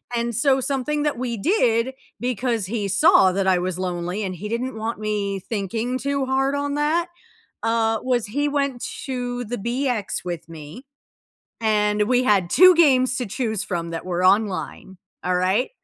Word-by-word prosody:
and 235 0 -1
so 265 +3 +3
something 280 +3 -1
that 295 -3 -1
we 245 -1 -2
did 245 - +1 0.2
because 240 -3 -1
he 210 -1 -2
saw 190 0 +5
that 195 +1 -1
I 185 -1 +4
was 180 0 -3
lonely 180 +2 -3
and 185 -2 -3
he 195 +5 -6
didn't 235 +1 -3
want 220 +1 -4
me 205 -2 -2
thinking 225 +5 -3
too 280 0 -1
hard 270 +1 +1
on 285 0 -2
that, 310 +4 +1 0.6
uh, 225 -1 +1
was 245 -3 0
he 285 +8 -1
went 280 -4 -1 0.2
to 245 -2 -3
the 245 +2 -4
BX 235 -2 -2
with 175 -2 -5
me, 160 - -10 0.7
and 210 -1 +2
we 255 0 +3
had 195 -6 +2
2 370 0 +7
games 260 -6 +4
to 245 - -2
choose 220 -1 -2
from 170 -5 -4
that 165 - -5
were 180 0 -2
online. 190 -1 0 0.3
Alright? 185 +6 +1
230 Hz, 165 wpm, -22 LUFS, 195-260 Hz, 0.7 s, 2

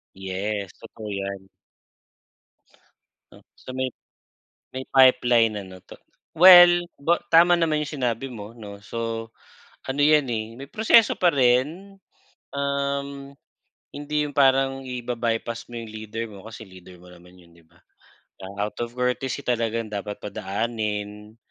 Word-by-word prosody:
Yes, 95 +1 -4
totoo 110 -1 -10
'yan. 100 -1 -5 2.1
Sa - - -11
may 130 0 -2 0.9
may 130 - -4
pipeline, 120 -4 +4
ano 95 -2 -9
‘to. - - -12 0.4
Well, 175 0 +9 0.2
ba 170 +5 +2
tama 170 +2 +6
naman 165 -3 +1
yung 150 0 -5
sinabi 120 +1 -1
mo 110 -4 -9
‘no. 100 -3 -11
So, 115 0 -5 0.5
ano 135 +2 -4
'yan, 150 -1 +4
eh, 110 -1 -2
may 135 +1 -10
proseso 220 0 +4
pa 180 - +4
rin, 145 +10 +1 0.6
um, 140 0 -3 0.6
hindi 150 +1 -2
yung 145 - -6
parang 135 -1 +2
iba-bypass 120 -2 -3
mo 120 - -9
yung 115 -1 -8
leader 110 +1 -6
mo 100 0 -13
kasi 110 0 -10
leader 95 -1 -15
mo 90 +1 -16
naman 90 +1 -17
yun, 85 -1 -20
‘di 85 - -21
ba? 85 +1 -27 0.6
Ah, 100 +2 -4
out - - -18
of 120 +1 -5
courtesy, 125 +2 -2
talagang 115 -2 -2
dapat 105 0 -5
padaanin. 105 0 -4
115 Hz, 135 wpm, -24 LUFS, 105-140 Hz, 2.1 s, Well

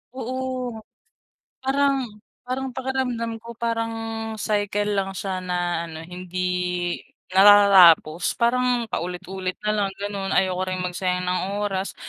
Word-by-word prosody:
Oo. 255 -2 -4 0.8
Parang 270 -2 +1 0.3
parang 260 +1 -4
pakiramdam 250 -3 -2
ko 230 +1 -10
parang 230 0 -2 0.5
cycle 205 -1 0
lang 195 0 -1
siya 190 -2 -3
na 175 -2 -2
ano 160 -1 -8
hindi 180 0 -2 0.3
natatapos. 190 -5 +6
Parang 240 -1 +1
paulit-ulit 185 +1 -4
na 210 - 0
lang 205 -2 +1
ganun, 200 -1 -3
ayoko 185 -1 +2
ring 185 0 -2
magsayang 180 0 -1
ng 180 0 0 0.2
oras. 195 -1 -2
200 Hz, 115 wpm, -23 LUFS, 180-235 Hz, 0.8 s, natatapos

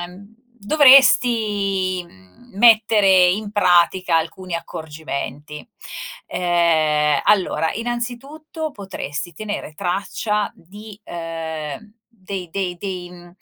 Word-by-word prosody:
ehm 190 +5 -11 0.3
dovresti, 210 - +4
mhmm, 95 - -22
mettere 210 -4 +5
in 205 +2 -3
pratica 180 -3 +3
alcuni 170 +2 -5
accorgimenti. 150 -3 -6 0.6
Ehm, 155 -4 +2
allora, 185 -5 +2
innanzitutto 250 +8 -5
potresti 185 - -6
tenere 205 -3 -6
traccia 200 +3 -2
di, 205 +4 -13
ehm 165 +2 -6
dei 190 -5 -7
dei 185 -1 -3
dei 180 -2 -6
mhmm 175 -1 -14
185 Hz, 90 wpm, -20 LUFS, 170-215 Hz, 0.6 s, mettere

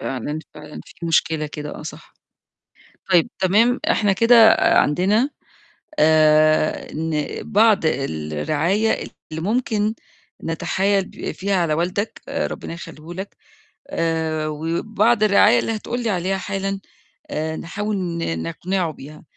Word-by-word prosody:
فعلًا، 135 +4 -4 0.2
فعلًا، 150 0 -10
في 175 -2 -8
مشكلة 160 -1 +1
كده 150 0 -7
آه - - -9
صح. - - -10 1.0
طيب 175 -3 +4
تمام 215 +7 +3
إحنا 205 -2 +2
كده 230 +1 +7
عندنا 200 - +3 0.7
آآ، 155 0 +4
إن 155 -1 -2 0.3
بعض 215 0 +5
الرعاية 145 - 0 0.4
اللي 160 +1 -4
ممكن 215 0 0 0.5
نتحايل 190 +4 0
ب - - -7
فيها 195 0 -1
على 165 -4 +1
والدك، 180 +6 -2
ربنا - - -3
يخلّيه 165 0 -10
لك، 190 +2 -7 0.5
آآ، 160 -2 -1
وبعض 205 +9 0
الرعاية 215 +3 +5
اللي 225 - -1
هتقول 240 +3 -4
لي 230 - 0
عليها 190 0 -1
حالًا 195 0 -3 0.5
آآ، 160 +1 -3
نحاول 205 +4 -3
ن 170 - -3
نقنعه 175 - -2
بيها، 150 +1 -12
175 Hz, 120 wpm, -21 LUFS, 155-205 Hz, 1.0 s, كده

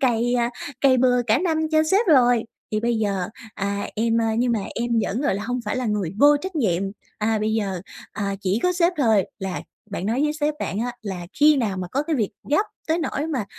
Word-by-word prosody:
cày, 245 -2 +2
à, 240 -1 +1 0.3
cày 265 -2 +5
bừa 250 -1 +3
cả 220 +2 +4
năm 325 -1 0
cho 310 0 +5
sếp 400 +3 +3
rồi, 245 -7 +5 0.3
thì 215 - +1
bây 235 -1 0
giờ, 195 -4 -1 0.3
à, 200 0 -2
em, 230 +1 +2
à, 225 -1 +1
nhưng 245 0 +2
mà 220 - 0
em 240 +1 -2
vẫn, 230 +6 -2
gọi 290 -9 +1
là, 200 - -3
hông 250 0 -1
phải 210 - -2
là 255 -2 -1
người 205 -6 -1
vô 290 0 +7
trách 370 +2 -5
nhiệm." 190 - +1 0.4
À, 220 +1 +1
bây 215 +1 0
giờ, 195 -5 -1 0.3
à, 200 -1 -2
chỉ 195 +2 0
có 360 - +3
sếp 350 0 +2
thôi 220 -7 +4
là 190 -1 -4 0.3
bạn 195 -1 -3
nói 235 +5 0
với 300 - +1
sếp 300 0 -1
bạn 195 - -2
á 245 +2 -1
là 185 -5 -5
khi 300 0 +7
nào 215 -7 0
mà 185 -1 -4
có 280 - +1
cái 310 -1 -1
việc 220 -3 0 0.2
gấp 305 +9 +3 0.2
tới 320 +2 +2
nỗi 310 -2 -2
mà 270 -10 -2
235 Hz, 240 wpm, -23 LUFS, 205-290 Hz, 0.4 s, vô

